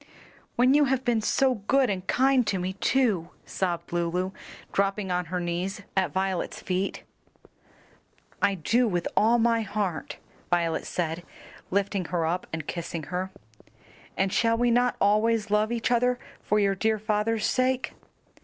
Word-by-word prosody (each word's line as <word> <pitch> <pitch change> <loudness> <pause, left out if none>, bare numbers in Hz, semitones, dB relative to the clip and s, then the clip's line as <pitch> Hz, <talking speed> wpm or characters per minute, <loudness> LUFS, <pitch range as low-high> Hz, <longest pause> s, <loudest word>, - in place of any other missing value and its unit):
when 250 +2 +4
you 295 0 +5
have 265 -1 0
been 235 -3 +2
so 265 +4 +2
good 270 -1 +4
and 190 -3 -3
kind 260 -2 +3
to 195 - +1
me 185 +1 -2
too," 200 -5 +1 0.2
sobbed 175 -3 -3
Lulu, 175 +2 0 0.4
dropping 195 -1 0
on 180 0 0
her 180 +2 -3
knees 180 +4 -3
at 190 -1 +1
Violet's 190 -1 -2
feet. 185 +1 -2 1.4
"I 200 -1 +3
do 230 +8 +2
with 175 -5 -1
all 230 +3 +4
my 230 0 +3
heart," 205 -6 -3 0.3
Violet 170 -2 0
said, 165 -1 -2 0.5
lifting 200 -1 0
her 170 -1 -1
up 175 +3 -2
and 160 -2 -4
kissing 165 -1 -4
her. 185 +1 -1 0.9
"And 190 0 +1
shall 230 -1 +3
we 240 0 +2
not 245 +1 +3
always 215 +1 +2
love 210 +2 +2
each 235 +1 -1
other 245 +1 +3 0.2
for 210 - +1
your 200 -1 +3
dear 220 +3 +1
father's 215 +1 0
sake?" 255 0 +1
200 Hz, 155 wpm, -27 LUFS, 180-230 Hz, 1.4 s, you